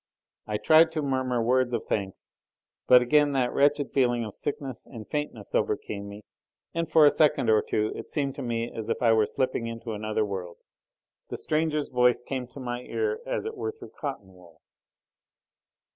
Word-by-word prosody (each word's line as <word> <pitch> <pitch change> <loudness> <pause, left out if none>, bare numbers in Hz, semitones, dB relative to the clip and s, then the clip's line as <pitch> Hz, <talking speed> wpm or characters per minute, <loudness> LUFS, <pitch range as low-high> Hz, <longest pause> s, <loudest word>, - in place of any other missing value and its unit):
I 105 -1 -1
tried 160 +6 +5
to 155 -2 -1
murmur 130 -3 0
words 125 +1 +2
of 115 - -4
thanks, 95 -2 -3 0.6
but 125 -1 +7
again 145 +2 +3
that 125 -2 +1
wretched 145 0 +2
feeling 120 -3 +2
of 105 - -7
sickness 135 -3 -5
and 115 -5 -10
faintness 150 -9 -4
overcame 100 -1 -2
me, 100 +1 -10 0.5
and 165 -1 -2
for 160 -1 +6
a 145 - +7
second 145 -7 +3
or 110 - +5
two 110 0 -1
it - - -8
seemed 140 -3 -1
to - - -4
me 115 -2 -2
as 110 -1 -6
if - - -1
I 115 -1 +5
were 110 -1 +3
slipping 130 -3 -1
into 115 0 -6
another 110 +1 -1
world. 95 -4 -6 0.7
The - - -4
stranger's 155 -1 -1
voice 125 -1 +3
came 130 -1 -4
to 125 +3 -12
my 120 -1 -4
ear, 440 - -2
as - - -2
it 445 0 -4
were 435 +1 -3
through 425 -3 -12
cotton 135 - -6
wool. 85 -3 -19
125 Hz, 185 wpm, -27 LUFS, 110-145 Hz, 0.7 s, but